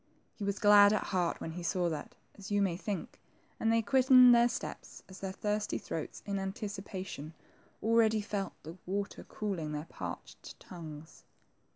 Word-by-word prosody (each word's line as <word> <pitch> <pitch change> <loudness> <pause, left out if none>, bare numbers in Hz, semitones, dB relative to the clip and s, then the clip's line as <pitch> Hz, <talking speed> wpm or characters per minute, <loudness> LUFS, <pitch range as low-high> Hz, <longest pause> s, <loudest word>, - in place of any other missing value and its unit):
He 210 - -8
was 200 0 -1
glad 205 0 +7
at 215 - +1
heart 180 -3 -1
when 160 - -5
he 175 +2 -6
saw 175 0 0
that, 155 -2 -6 0.2
as 200 +1 -10
you 205 0 +2
may 190 -4 +1
think, 195 0 -5 0.4
and 225 - +2
they 230 0 +3
quickened 255 +2 +7
their 235 0 +5
steps 245 - -6
as 190 0 -12
their 195 -1 -4
thirsty 210 +2 -1
throats, 160 - -6
in 200 -1 -2
anticipation, 195 - -6 0.5
already 220 -1 +4
felt 205 -1 -3
the 160 +4 -9
water 200 +2 -3
cooling 175 -8 -4
their 150 +1 -4
parched - - -8
tongues. 160 -3 -10
200 Hz, 165 wpm, -32 LUFS, 175-215 Hz, 0.5 s, glad